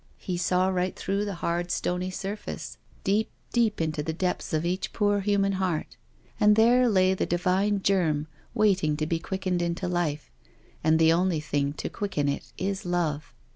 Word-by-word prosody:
He 185 - -4
saw 180 +1 +2
right 185 0 -1
through 200 +2 -1
the 200 -2 -3
hard 175 +1 -1
stony 180 +1 -1
surface, 195 +3 -6 0.2
deep, 210 +3 +1 0.2
deep 230 -3 +2
into 155 -2 -1
the 160 - -2
depths 180 +2 -2
of 155 +1 0
each 180 +2 -2
poor 205 -1 +2
human 200 0 +2
heart, 185 -5 -2 0.4
and 210 -1 +6
there 240 +3 +5
lay 185 -2 +4
the 190 - -1
divine 190 +3 +1
germ 160 -7 +2 0.3
waiting 190 -9 +2
to 155 - -1
be 165 +1 -1
quickened 185 0 -2
into 175 +2 -1
life— 170 -4 -2 0.5
and 160 0 +4
the 160 0 +5
only 175 -1 +1
thing 145 -2 -1
to - - -4
quicken 175 -8 -2
it 140 - -3
is 195 +1 -2
love. 170 -4 -1
180 Hz, 175 wpm, -27 LUFS, 165-195 Hz, 0.5 s, and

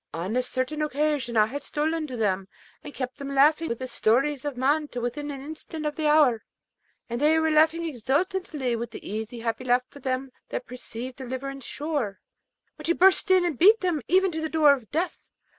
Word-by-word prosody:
On 180 +7 -3
a 255 - +3
certain 255 +4 -2
occasion 295 -5 0
I 215 - +6
had 280 +6 -5
stolen 310 +1 -1
to 255 -3 -6
them, 195 -3 0 0.4
and 295 - -8
kept 255 0 -5
them 275 0 -5
laughing 305 +4 +4
with 245 +2 -3
stories 265 +5 +1
of 285 -4 -3
man 290 +4 +2
to 245 - -6
within 245 +5 -3
an 275 -2 -6
instant 310 +1 -7
of 300 0 -2
the 310 -1 0
hour; 290 -7 +4 0.6
and 235 +2 -4
they 310 +2 +4
were 320 0 +2
laughing 320 +2 +3
exultingly 290 - -1
with 230 0 -4
the 230 - -10
easy 220 +3 -5
happy 230 +2 -2
laugh 245 0 +3
of 285 - -11
them 260 0 -2 0.2
that 250 - -4
perceive 250 0 -7
deliverance 265 +1 -6
sure, 280 -10 -3 0.6
when - - -9
she 340 - +3
burst 380 +2 +4
in 370 -1 +5
and 320 -8 -2
beat 425 +6 +7
them 350 -5 0
even 375 +1 +3
to 320 -1 -4
the 315 - -2
door 305 -3 +5
of 250 -6 -6
death. 335 +4 -3
280 Hz, 205 wpm, -26 LUFS, 245-315 Hz, 0.6 s, beat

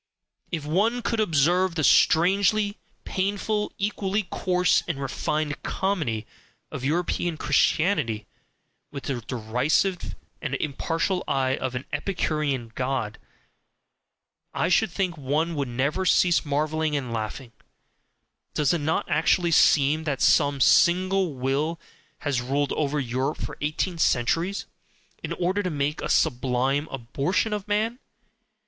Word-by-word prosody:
If 160 -5 -3
one 215 +10 +1
could 230 -1 -1
observe 175 0 +2
the 155 - -1
strangely 200 +7 +3 0.2
painful, 205 +2 -1
equally 205 0 -1
coarse 180 -1 +2
and 165 -5 -3
refined 150 +2 -2
comedy 155 - -1 0.5
of - - -6
European 170 +2 -1
Christianity 150 - +1 0.6
with 140 -2 -7
the 130 -4 -3
derisive 125 - -1 0.3
and 140 -3 -2
impartial 165 +6 -1
eye 135 -1 +1
of 130 -1 -4
an 125 - -4
Epicurean 150 - -1
god, 125 -4 -2 1.4
I - - +1
should - - +3
think 175 -2 -2
one 150 +5 0
would 140 -4 -2
never 140 +9 -1
cease 175 -2 +4
marvelling 155 +1 -1
and 130 -5 -3
laughing; 115 +3 -5 1.0
does 150 +2 +2
it 170 - -1
not 155 +2 0
actually 170 +2 +2
seem 155 0 +4
that 140 -3 -1
some 140 -1 +3
single 185 +1 +4
will 140 +6 -1 0.4
has 145 -7 0
ruled 140 +3 -1
over 150 -1 0
Europe 130 +3 -2
for - - -5
eighteen 160 +4 -2
centuries 165 - +1 0.6
in - - -5
order 185 +3 0
to 185 - -2
make 150 -1 -2
a - - -3
SUBLIME 135 +1 +1
ABORTION 140 - -1
of 210 -1 -4
man? 220 +4 0
155 Hz, 125 wpm, -25 LUFS, 135-180 Hz, 1.4 s, cease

